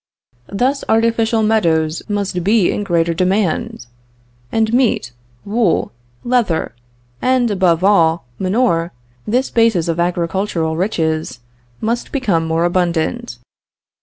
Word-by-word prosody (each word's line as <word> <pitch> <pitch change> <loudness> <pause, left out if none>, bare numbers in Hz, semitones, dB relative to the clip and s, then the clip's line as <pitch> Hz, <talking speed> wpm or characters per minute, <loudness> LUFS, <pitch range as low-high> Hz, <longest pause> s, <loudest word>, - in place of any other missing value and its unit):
Thus 255 +7 0
artificial 225 0 +2
meadows 165 -7 +1
must 200 -4 -2
be 205 -1 +3
in 205 - -2
greater 170 -3 +1
demand; 190 - -1 0.7
and 220 0 +1
meat, 240 - +1 0.3
wool, 210 -3 0 0.3
leather, 235 - 0 0.5
and 255 -3 +2
above 185 -3 +2
all, 170 -6 +3
manure, 185 -4 0 0.3
this 250 +5 0
basis 225 -8 +2
of 165 0 -1
agricultural 170 -1 -1
riches, 160 - -1 0.4
must 235 +2 -2
become 200 - 0
more 165 +1 +1
abundant. 175 -8 -1
190 Hz, 105 wpm, -17 LUFS, 165-225 Hz, 0.7 s, be